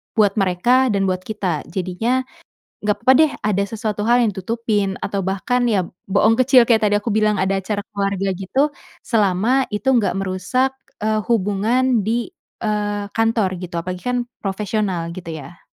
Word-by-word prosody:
buat 210 -1 +3
mereka 235 +8 +3
dan 200 -4 +1
buat 185 - -2
kita. 190 -8 -2
Jadinya 195 +9 -1 0.6
nggak 210 0 +1
papa 255 +4 +4
deh, 310 +1 +5 0.2
ada 200 -1 +1
sesuatu 210 0 -3
hal 240 +3 +4
yang 205 - -3
ditutupin 205 -1 -1
atau 200 -1 -2
bahkan 200 +7 0
ya 185 -4 +1 0.2
bohong 205 +3 +3
kecil, 255 -1 +5
kayak 225 -3 +3
tadi 205 0 +3
aku 210 0 -2
bilang 215 -1 +2
ada 190 +1 +1
acara 205 +2 -2 0.2
keluarga 195 -1 -1
gitu. 270 +11 0 0.2
Selama 220 +4 +2
itu 210 +6 -4
enggak 235 -7 +3
merusak, 195 +8 -1 0.2
eee, 215 0 0
hubungan 225 +4 +2
di, 230 +3 -1 0.3
eee, 205 -1 -1
kantor, 225 -4 +1
gitu. 175 -1 -5
Apalagi 180 +1 -5
kan 250 0 0 0.3
profesional, 195 -4 -2
gitu 175 -3 -7
ya. 155 +2 -10
210 Hz, 160 wpm, -20 LUFS, 190-230 Hz, 0.6 s, deh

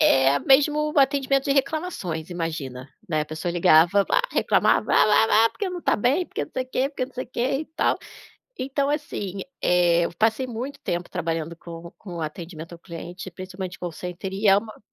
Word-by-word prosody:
é, 135 +1 +5
mesmo 300 +2 +3
atendimento 275 0 +3
de 280 - +2
reclamações. 275 - -2
Imagina, 155 -7 -4 0.2
né? 155 -3 +1
A - - -4
pessoa 160 +3 -4
ligava 175 +3 +5
"ah", - - +5
reclamava: - - +2
"Ah, - - +6 0.3
ah, 220 - +6
ah, - - -2
porque 400 -3 -4
não 360 -1 -5
tá - - +2
bem, 270 - +2
porque - - -4
não - - -21
sei 255 - -2
que, 260 +1 0
porque 260 -3 -3
não 265 - -19
sei 255 - -4
que 235 - -5 0.2
e - - -4
tal". - - +1 0.6
Então, 275 +2 -1
assim, 210 - -3 0.2
eh, 175 -1 +3
eu - - -5
passei 225 +4 +2
muito 250 +4 -5
tempo 175 0 -3
trabalhando 165 0 -3
com 170 0 -10
com 175 -5 -7
atendimento 165 +1 -7
ao 170 - -10
cliente, 175 +2 -8
principalmente 185 +1 -7
call 175 -1 -5
center 180 +3 -6
e 200 +2 0
é 195 - +7
uma 215 +1 -6
190 Hz, 195 wpm, -24 LUFS, 170-265 Hz, 0.6 s, é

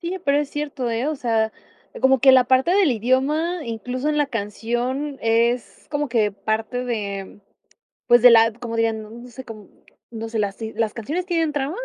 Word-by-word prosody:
Sí, 355 +2 -4
pero 280 +1 +3
es 295 -1 -1
cierto, 290 -4 -4
¿eh? 235 +5 -1
O 310 - -2
sea, 225 -3 0 0.5
como 265 -1 +4
que 265 +1 +7
la 260 -1 +6
parte 260 +5 +2
del 380 -9 +4
idioma, 290 - 0
incluso 250 +5 -4
en 300 - 0
la 295 - +2
canción, 240 +5 -3
es 235 +2 0
como 290 -1 -1
que 220 -3 +1
parte 220 +4 -3
de, 200 -4 -5 0.7
pues, 240 0 +6
de 250 - +9
la 225 0 +6
como 235 -1 -7
dirían 225 -1 0
no, 215 - -12
no 240 +2 -11
sé 260 +2 -10
com 215 -4 -11 0.4
no 225 -1 -6
sé, 225 -1 -2
las 200 -1 -2
sí 220 -1 -6
¿las 220 -1 -1
canciones 305 +11 -4
tienen 330 -4 0
trama? 285 +4 -2
245 Hz, 200 wpm, -22 LUFS, 225-285 Hz, 0.7 s, de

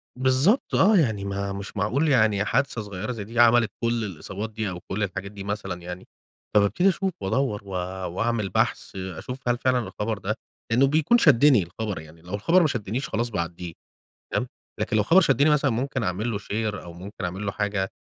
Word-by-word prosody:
بالضبط 130 - +2
آه. 205 +2 +5
يعني 110 - +1
ما 100 0 -3
مش 100 +1 -7
معقول 130 +11 +1
يعني 110 -6 +3
حادثة 125 0 0
صغيرة 105 +3 -5
زي 110 -4 -5
دي 115 +3 -5
عملت 120 -1 +5
كل 115 -1 +1
الإصابات 100 +3 -5
دي 110 -1 -3
أو 90 -1 -6
كل 100 +4 -3
الحاجات 100 0 -4
دي 100 -1 -8
مثلًا 100 -3 -4
يعني. 90 +1 -8 0.5
فبابتدي 105 - +4
أشوف 190 +1 -1
وأدوّر 105 +1 0
و 100 - -13 0.5
وأعمل 115 -3 0
بحث 110 -1 -1
أشوف 95 +7 -6
هل 120 0 +2
فعلًا 125 0 +2
الخبر 110 0 -3
ده 105 +2 -2 0.4
لإنّه 130 +4 +5
بيكون 155 - +3
شدّني 140 - +5
الخبر. 100 +2 -5
يعني 80 +1 -14
لو 90 +3 -10
الخبر 165 - +3
ما 160 - +4
شدّنيش 120 +4 -3
خلاص 120 +2 -1
باعدّيه 85 -3 -4 0.6
تمام؟ - - 0 0.3
لكن 110 - 0
لو 105 - +3
خبر 180 - +6
شدّني 140 0 +4
مثلًا 145 -3 +3
ممكن 130 +2 -2
أعمل 105 +5 -1
له 100 - -1
شير 105 0 -3
أو 85 -1 -10
ممكن 95 +2 -7
أعمل 95 +4 -4
له 100 - -1
حاجة. 100 -1 -1
110 Hz, 195 wpm, -25 LUFS, 100-125 Hz, 0.6 s, خبر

